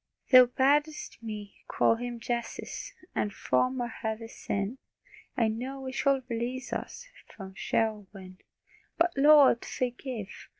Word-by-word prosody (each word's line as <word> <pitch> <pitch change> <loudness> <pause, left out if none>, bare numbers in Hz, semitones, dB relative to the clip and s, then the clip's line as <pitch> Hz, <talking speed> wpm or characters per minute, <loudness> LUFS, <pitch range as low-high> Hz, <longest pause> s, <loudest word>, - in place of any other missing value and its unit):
Thou 255 -1 +9
bad'st 290 +3 +1
me 210 -3 -7
call 230 - +2
Him 240 0 -5
"Jesus," 235 0 -4 0.2
And 210 - -1
from 255 +5 0
our 240 - -1
heavy 225 -1 -5
sin 205 +3 -3 0.6
I 230 -3 +3
know 260 +5 -4
He 260 - -4
shall 270 -1 +1
release 245 +2 -3
us, - - -5 0.2
From 190 -2 -10
Sheol 215 +1 -1
win. 185 -2 -12 0.6
But, 340 0 +2
Lord, 280 -3 +6
forgive! 245 -4 -5
240 Hz, 130 wpm, -29 LUFS, 220-265 Hz, 0.6 s, Thou